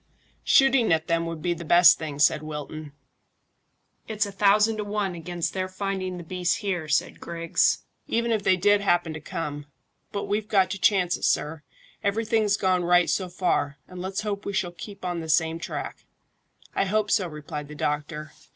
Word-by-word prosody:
"Shooting 270 -5 +4
at 160 0 +2
them 165 -1 0
would 165 -2 -6
be 175 - +1
the 170 0 -8
best 175 +2 +6
thing," 150 -3 -5
said 145 +1 +4
Wilton. 155 0 -7 1.2
"It's 215 -1 0
a 200 - -6
thousand 210 +2 +3
to 210 - -2
one 205 -2 -2
against 175 0 -4
their 185 -1 -2
finding 185 -1 -3
the 175 - -7
beasts 180 +1 0
here," 185 -7 -3
said 145 - 0
Griggs, 170 -1 0 0.2
"even 235 0 0
if 220 -2 +1
they 190 -1 +3
did 205 +2 +4
happen 175 -4 +1
to 155 - -7
come. 145 -1 -5 0.4
But 200 - -3
we've 210 +1 -2
got 195 -4 +3
to 195 - -4
chance 180 -4 +3
it, - - -14
sir. 150 +1 0 0.4
Everything's 215 0 +1
gone 185 -2 +1
right 175 0 +4
so 185 -2 -1
far, 160 -6 0
and 180 -1 -9
let's 190 +2 -3
hope 205 -1 -3
we 200 - -4
shall 195 -3 -1
keep 195 +2 -10
on 175 -1 -2
the 160 -1 -6
same 160 +1 +2
track." - - -6 0.7
"I - - +1
hope 210 +1 0
so," 190 -5 +2
replied 150 -1 -7
the 150 - -10
doctor. 150 +1 -3
180 Hz, 190 wpm, -25 LUFS, 160-200 Hz, 1.2 s, best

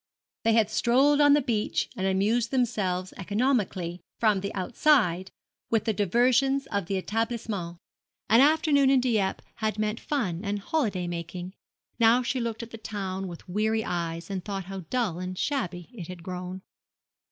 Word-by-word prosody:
They 225 - +4
had 220 -2 +3
strolled 270 +6 +4
on 290 -1 +7
the 290 -1 +4
beach 220 -4 0
and 190 -3 -1
amused 215 +5 +1
themselves 200 -8 0
economically, 200 -5 -1 0.2
from 215 -4 +3
the 200 +2 -4
outside, 190 - +2 0.4
with 220 -2 +1
the 220 - +1
diversions 250 +7 +2
of 200 -4 -1
the 195 - -1
établissement. 220 -5 -3 0.5
An 230 +4 +6
afternoon 290 -2 +4
in 270 -1 +5
Dieppe 220 -6 0
had 215 -1 -1
meant 215 +1 -1
fun 195 - -2
and 205 0 -1
holiday 200 - -1
making. 175 +1 -5 0.5
Now 230 +2 +5
she 255 +2 -1
looked 230 -1 -3
at 230 - -10
the 225 - -8
town 195 -3 -4
with 170 -2 -10
weary 220 +4 0
eyes, 170 0 -3
and 190 -2 -3
thought 195 -2 -4
how 190 -2 -7
dull 225 -9 0
and 185 0 -5
shabby 180 - -2
it 180 -9 -8
had 180 -2 -9
grown. 180 +1 -6
210 Hz, 165 wpm, -27 LUFS, 185-240 Hz, 0.5 s, on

